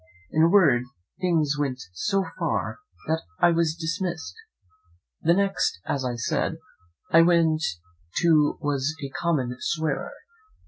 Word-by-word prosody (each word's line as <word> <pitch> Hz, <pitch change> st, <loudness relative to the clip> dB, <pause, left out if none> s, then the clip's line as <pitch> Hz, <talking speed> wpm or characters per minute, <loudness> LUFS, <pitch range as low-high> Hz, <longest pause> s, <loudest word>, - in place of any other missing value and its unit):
In 155 Hz, -, +2 dB
a 165 Hz, -, +6 dB
word, 165 Hz, -11 st, +5 dB, 0.4 s
things 160 Hz, -5 st, +1 dB
went 135 Hz, -3 st, -1 dB
so 195 Hz, -, 0 dB
far -, -, -1 dB, 0.3 s
that 160 Hz, +1 st, 0 dB, 0.2 s
I 175 Hz, -, +5 dB
was 165 Hz, -1 st, +1 dB
dismissed. 170 Hz, 0 st, -3 dB, 0.9 s
The 170 Hz, +1 st, +4 dB
next, 195 Hz, -, 0 dB
as 135 Hz, -, -1 dB
I 125 Hz, -1 st, -2 dB
said, 120 Hz, +6 st, -1 dB, 0.5 s
I 165 Hz, -, +7 dB
went 165 Hz, -2 st, +3 dB, 0.5 s
to 155 Hz, -4 st, +3 dB
was 145 Hz, +1 st, 0 dB
a -, -, -5 dB
common 135 Hz, -4 st, -1 dB
swearer. 160 Hz, -1 st, -1 dB
160 Hz, 130 wpm, -25 LUFS, 145-170 Hz, 0.9 s, I